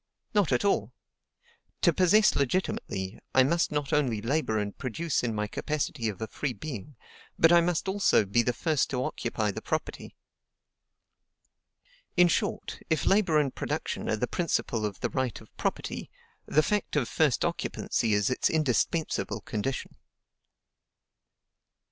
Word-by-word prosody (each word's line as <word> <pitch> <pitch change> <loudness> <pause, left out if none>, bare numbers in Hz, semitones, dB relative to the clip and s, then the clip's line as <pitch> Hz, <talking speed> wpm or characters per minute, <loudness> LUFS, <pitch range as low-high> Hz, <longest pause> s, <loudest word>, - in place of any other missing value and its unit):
Not 205 -8 +2
at 125 +9 +2
all. 200 - +1 0.9
To - - +5
possess 200 +4 +4
legitimately, 120 - -1 0.2
I 130 - +7
must 165 +6 +1
not 145 -2 -2
only 130 -7 +2
labor 115 0 0
and 105 -1 -2
produce 140 +5 -2
in 115 -3 -2
my 105 0 0
capacity 135 0 -2
of 100 - -7
a - - -3
free 135 +4 -3
being, 145 -1 -7 0.4
but 165 - +6
I 170 0 +7
must 170 0 0
also 190 - +3
be 105 +5 +2
the 125 - +1
first 155 +4 0
to 125 -2 -1
occupy 110 -4 -2
the - - -6
property. 155 - -4 2.0
In 180 0 +7
short, - - -1
if 160 - +1
labor 195 -6 +4
and 145 -3 +1
production - - -3
are - - +2
the 125 - 0
principle 120 -9 -1
of 100 - -8
the - - 0
right 130 -4 -1
of - - -18
property, - - -3 0.4
the 155 - +3
fact 210 -2 -1
of 140 -5 +1
first 150 -6 +2
occupancy 110 -3 -1
is 105 +4 +1
its 130 - +1
indispensable 155 +1 0
condition. 115 +5 -4
140 Hz, 150 wpm, -28 LUFS, 115-160 Hz, 2.0 s, I